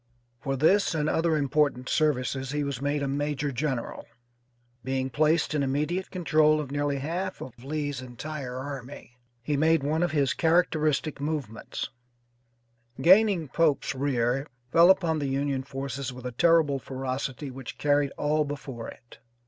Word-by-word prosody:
For 135 0 -2
this 175 +6 +3
and 150 -1 0
other 160 0 +2
important 140 -3 +1
services 135 -3 0
he 150 +1 -1
was 140 -3 -4
made 145 0 0
a - - 0
major 145 +1 -1
general. 130 -2 -3 0.8
Being 130 +1 -2
placed 155 +3 +2
in 150 - +1
immediate 150 +7 -1
control 155 -4 +3
of 145 -3 -5
nearly 145 0 0
half 175 +7 -3
of 125 -1 -10
Lee's 145 -1 -3
entire 130 +1 -6
army, 130 -2 -8 0.2
he 145 +3 0
made 160 +1 +3
one 155 +3 0
of 175 - +2
his 140 -6 +1
characteristic 155 -2 +1
movements; 145 -7 -4 1.1
gaining 190 -2 +5
Pope's 160 -2 +1
rear, 135 0 0 0.2
fell 170 +2 +7
upon 170 -5 +3
the 140 -2 -2
Union 135 0 -1
forces 135 0 -5
with 125 0 -10
a 125 - -3
terrible 155 +1 +3
ferocity 130 +1 -4
which 130 -1 -8
carried 145 -1 +2
all 150 +1 +1
before 140 -5 -6
it. 120 - -13
145 Hz, 150 wpm, -27 LUFS, 135-155 Hz, 1.1 s, fell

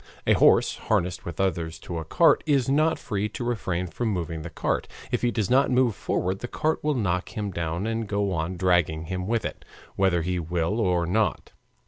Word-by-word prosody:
A - - +5
horse - - +4
harnessed 90 +1 -1
with 85 - -6
others 85 -4 -1
to 85 -2 -5
a - - -4
cart 165 - +4
is 140 -4 +3
not 155 +4 +3
free 105 -2 -2
to 120 - -6
refrain 95 -7 -1
from 115 +7 -3
moving 85 -5 -3
the - - -6
cart. - - -2 0.2
If - - 0
he 120 - +2
does 110 -4 -1
not 135 +2 +4
move 125 -4 +3
forward 95 +2 -1
the 120 - -5
cart 155 +5 -1
will 150 -1 +1
knock 90 -6 -1
him 105 -2 -2
down 85 +2 -2
and 115 -1 -2
go 100 -1 0
on 85 +1 -2
dragging 85 -3 +2
him 90 +2 -4
with 115 0 0
it, - - -5 0.3
whether 95 -3 +2
he 90 +1 -1
will 85 +5 -1
or 90 -5 +2
not. 100 +2 0
95 Hz, 205 wpm, -26 LUFS, 85-115 Hz, 0.3 s, A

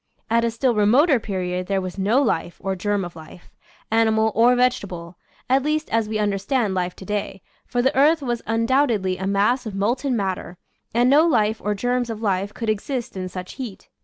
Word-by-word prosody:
At 230 0 +3
a 235 - +2
still 235 +2 +1
remoter 245 +7 +4
period 180 -3 -3
there 195 -1 +1
was 185 +1 -6
no 225 +9 +3
life 175 -7 -1
or 190 0 -2
germ 205 +1 -1
of 175 - -9
life, 160 +2 -13 0.4
ani 225 0 +4
mal 220 0 +2
or 240 +3 +5
vegetable, 200 -9 -1 0.3
at 265 +2 +3
least 305 +2 -1
as 225 -1 +1
we 215 - -1
understand 205 +2 0
life 180 -1 -2
to 190 - -11
day, 200 -2 -4 0.2
for 245 -1 0
the 265 +3 +2
earth 295 +3 +4
was 240 -2 -2
undoubtedly 225 -5 +1
a 190 - -2
mass 210 +5 +1
of 205 - -6
molten 240 +6 0
matter, 190 -3 -3 0.3
and 240 +2 +3
no 295 +5 +5
life 220 -7 +1
or 210 0 0
germs 245 +3 -1
of 225 -2 -4
life 200 -2 -1
could 230 +1 -6
exist 225 +3 -2
in 185 -1 -4
such 180 0 -8
heat. 225 -7 -8
220 Hz, 200 wpm, -22 LUFS, 195-245 Hz, 0.4 s, or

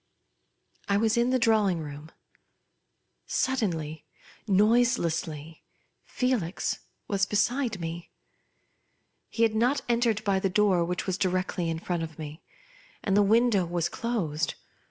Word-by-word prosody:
I 200 - +3
was 220 +2 +2
in 240 +1 +2
the 255 - +3
drawing 215 -7 +3
room. 150 0 -8 1.2
Suddenly, 165 - -1 0.4
noiselessly, 175 -8 +1 0.4
Felix 240 -9 -1 0.3
was 200 -1 +1
beside 225 +1 0
me. 165 0 -6 1.2
He 230 - 0
had 225 -1 +3
not 245 +6 +2
entered 235 -3 +1
by 195 -2 +2
the 195 - 0
door 190 -2 +3
which 180 +1 -2
was 190 0 -2
directly 185 -2 0
in 165 - -2
front 175 +1 -3
of 160 -2 -6
me; 155 0 -8 0.6
and 195 - +1
the 205 - +6
window 220 -1 +4
was 170 -1 -1
closed. 170 -10 -2
195 Hz, 125 wpm, -27 LUFS, 165-225 Hz, 1.2 s, the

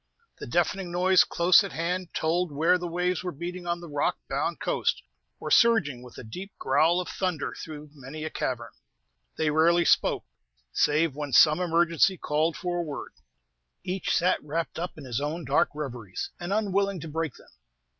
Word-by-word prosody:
The - - -7
deafening 190 -3 0
noise 180 +1 +5
close 175 +3 +4
at 195 - -6
hand 175 +2 -2
told 170 +1 0
where 165 +5 +3
the 175 - -4
waves 180 +1 -1
were 180 - -3
beating 175 +3 -6
on 170 0 -1
the 170 - -9
rock 145 -2 0
bound - - -2
coast, - - 0 0.4
or - - -5
surging 220 - +4
with 125 -1 -13
the - - -9
deep 185 - -8
growl 160 +6 +3
of 180 - -3
thunder 180 -5 -2
through 150 -2 -9
many 145 +2 -8
a 155 - -4
cavern. 120 -2 -3 0.7
They 155 -1 +1
rarely 170 +3 +4
spoke, - - +2 0.5
save 150 -1 +2
when 145 -2 -5
some 155 +2 +6
emergency 170 +1 +2
called 155 +1 0
for 175 -1 -2
a - - +1
word. 150 -5 -6 0.7
Each 185 0 -1
sat 180 +2 +1
wrapped 160 +3 -3
up 175 0 -5
in 150 - -9
his 130 0 -3
own 155 +3 -3
dark 135 +2 +2
reveries, 120 -10 -5
and 175 +1 -5
unwilling 200 -2 0
to 165 - -6
break 160 -2 -3
them. - - -18
165 Hz, 180 wpm, -27 LUFS, 150-180 Hz, 0.7 s, some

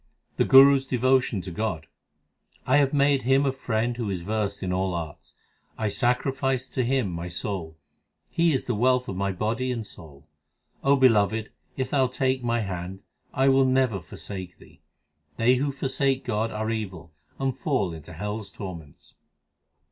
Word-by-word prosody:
The - - +3
Guru 135 +1 +8
s 135 0 -6
devotion 130 -4 +2
to 90 - -7
God: 85 -4 -3 0.8
1 145 +3 +4
have 140 -2 +3
made 140 -1 +3
Him 135 +3 +3
a 135 - +2
friend 120 -2 -1
who 115 -4 -2
is 90 -3 -3
versed 105 0 -2
in 90 -1 -1
all 95 -1 -1
arts; 80 -3 -7 0.4
I 110 -1 -1
sacrifice 130 +2 0
to 130 - -1
Him 125 -5 0
my 85 +1 -5
soul: 85 -1 -4 0.5
He 170 0 +3
is 130 - -1
the 125 - -1
wealth 125 +3 +2
of 95 - -4
my 100 +1 -1
body 115 +7 -1
and 115 -3 -3
soul. 75 -6 -13 0.6
O 140 +1 +5
Beloved, 110 -4 +3 0.3
if 130 -1 -2
Thou 135 -3 +3
take 130 0 -1
my 120 -1 0
hand, 95 -1 -5 0.3
I 135 +1 +2
will 135 0 +5
never 130 -5 +2
forsake 90 +2 -8
Thee. - - -19 0.6
They 125 +3 +4
who 140 +2 0
forsake 135 0 -1
God 110 +2 -1
are 110 +1 -3
evil 95 -7 -5 0.2
and 135 -2 -1
fall 125 - -1
into 80 +2 -10
hell 105 +6 -4
s 100 - -9
tor 95 -4 -7
ments. 75 -4 -15
115 Hz, 175 wpm, -26 LUFS, 95-130 Hz, 0.8 s, Guru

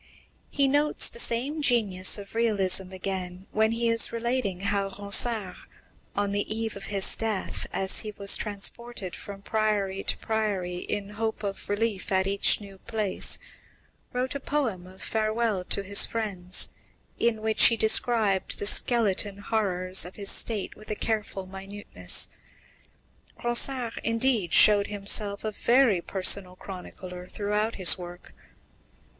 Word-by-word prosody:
He 280 -1 +1
notes 290 +2 +4
the - - -6
same 265 +7 0
genius 210 -9 +3
of 200 -1 -11
realism 195 -5 +1
again 185 -1 -5
when 220 +1 +1
he 230 +1 0
is 230 0 +3
relating 230 -5 -2
how 200 0 -1
Ronsard, 200 +1 +2 0.6
on 205 0 -1
the 205 +1 -2
eve 225 0 -2
of 200 0 -7
his 195 -2 +3
death, 220 -3 -2
as 190 0 -1
he 215 - -4
was 200 -1 +3
transported 210 -1 -4
from 200 -1 -10
priory 205 -3 -1
to - - 0
priory, 205 -5 -3
in 200 +2 -4
hope 220 +1 -4
of 195 -1 -6
relief 205 -1 -2
in 190 0 +1
each 200 0 +4
new 200 -2 -13
place, 215 -3 -2 0.7
wrote 250 +1 -3
a 280 - -4
poem 245 -11 -3
of 185 +1 -12
farewell 220 -2 -1
to 200 - 0
his 200 +1 +4
friends, 190 -5 0 0.5
in 225 -2 0
which 220 0 +5
he 230 - +5
described 220 -3 +2
the - - -3
skeleton 205 -3 +1
horrors 190 -3 0
of 180 - -10
his 200 -1 -1
state 215 -4 -2
with 215 - -15
a - - -1
minute - - -22
carefulness, 200 -2 -1 1.2
Ronsard, 240 0 +2
indeed, 230 -5 +1
showed 205 -1 +6
himself 205 0 +2
a 215 - -3
very 235 -3 +2
personal 185 0 +2
chronicler 180 -1 -10
throughout 210 +3 -2
his 185 -1 +4
work. 175 0 -11
205 Hz, 140 wpm, -26 LUFS, 190-225 Hz, 1.2 s, showed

